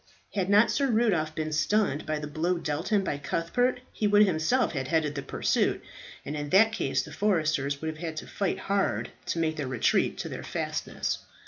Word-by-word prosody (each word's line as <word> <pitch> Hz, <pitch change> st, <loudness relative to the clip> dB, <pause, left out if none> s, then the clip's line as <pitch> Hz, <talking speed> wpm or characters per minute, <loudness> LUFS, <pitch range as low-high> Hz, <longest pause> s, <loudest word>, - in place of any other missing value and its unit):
Had 190 Hz, -2 st, -1 dB
not 210 Hz, +2 st, +5 dB
Sir 275 Hz, +3 st, +1 dB
Rudolph 200 Hz, -10 st, +1 dB
been 155 Hz, 0 st, -2 dB
stunned 155 Hz, -1 st, +1 dB
by 155 Hz, 0 st, 0 dB
the 150 Hz, -, -5 dB
blow 160 Hz, +4 st, -1 dB
dealt 155 Hz, 0 st, -3 dB
him 210 Hz, -3 st, +2 dB
by 145 Hz, -6 st, -2 dB
Cuthbert, 245 Hz, -, 0 dB
he 215 Hz, -, 0 dB
would 205 Hz, +1 st, +6 dB
himself 190 Hz, +8 st, +1 dB
have 135 Hz, -4 st, -3 dB
headed 155 Hz, -1 st, +1 dB
the 140 Hz, -, -4 dB
pursuit, -, -, 0 dB, 0.4 s
and 150 Hz, -, -4 dB
in 145 Hz, -1 st, -4 dB
that 220 Hz, +7 st, +6 dB
case 135 Hz, -10 st, 0 dB
the -, -, -10 dB
foresters 155 Hz, -8 st, 0 dB
would -, -, -2 dB
have 155 Hz, -1 st, -4 dB
had 160 Hz, -2 st, -5 dB
to -, -, -5 dB
fight 195 Hz, -3 st, -2 dB
hard 200 Hz, 0 st, -1 dB, 0.2 s
to -, -, -1 dB
make 160 Hz, -1 st, 0 dB
their 145 Hz, -3 st, -2 dB
retreat 130 Hz, -3 st, +1 dB
to -, -, -4 dB
their -, -, -6 dB
fastness. -, -, -3 dB
160 Hz, 205 wpm, -28 LUFS, 150-205 Hz, 0.4 s, would